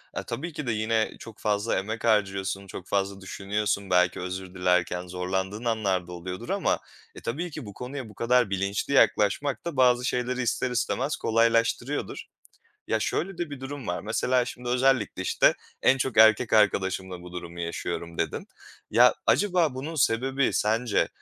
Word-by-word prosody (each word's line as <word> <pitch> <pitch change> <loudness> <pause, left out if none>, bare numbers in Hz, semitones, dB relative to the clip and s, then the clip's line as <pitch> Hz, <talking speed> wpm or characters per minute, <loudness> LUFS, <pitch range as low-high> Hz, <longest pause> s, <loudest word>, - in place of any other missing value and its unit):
E, - - -3
tabii 150 +8 -5
ki 150 -4 -5
de - - +2
yine 110 0 +1
çok 110 -2 -11
fazla 105 +1 0
emek 110 +3 -5
harcıyorsun, 95 -3 +1
çok 95 -1 -9
fazla 100 0 -1
düşünüyorsun, 100 +1 -2
belki 90 0 +3
özür 90 0 -5
dilerken 90 -1 +1
zorlandığın 95 +4 -3
anlar 100 -6 0
da 90 - -9
oluyordur 90 +1 -7
ama, - - +1 0.4
e, - - -10
tabii 165 +9 -3
ki 150 -4 -7
bu 100 - -9
konuya 125 +1 -6
bu 105 - -15
kadar 120 -1 +2
bilinçli 100 +6 -1
yaklaşmak 130 - +2
da 170 -5 -4
bazı 125 -1 +4
şeyleri 125 0 -1
ister 125 +1 0
istemez 130 +3 0
kolaylaştırıyordur. 115 +4 +1 0.6
Ya, 110 - 0
şöyle 175 - -2
de 170 -3 -3
bir 140 -2 -7
durum 135 -2 -6
var. 90 - -2
Mesela 125 +3 +1
şimdi 125 0 -7
özellikle, 125 -6 +2
işte, - - +3 0.3
en 135 - +5
çok 130 -2 -2
erkek 110 +2 +6
arkadaşımla 95 -3 +2
bu 90 0 -11
durumu 85 -1 -7
yaşıyorum, 85 0 -4
dedin. - - -2 0.4
Ya, - - +6
acaba 180 -8 +3
bunun 145 +5 -5
sebebi 130 0 +1
sence, 110 +2 +1
110 Hz, 165 wpm, -26 LUFS, 95-125 Hz, 0.6 s, erkek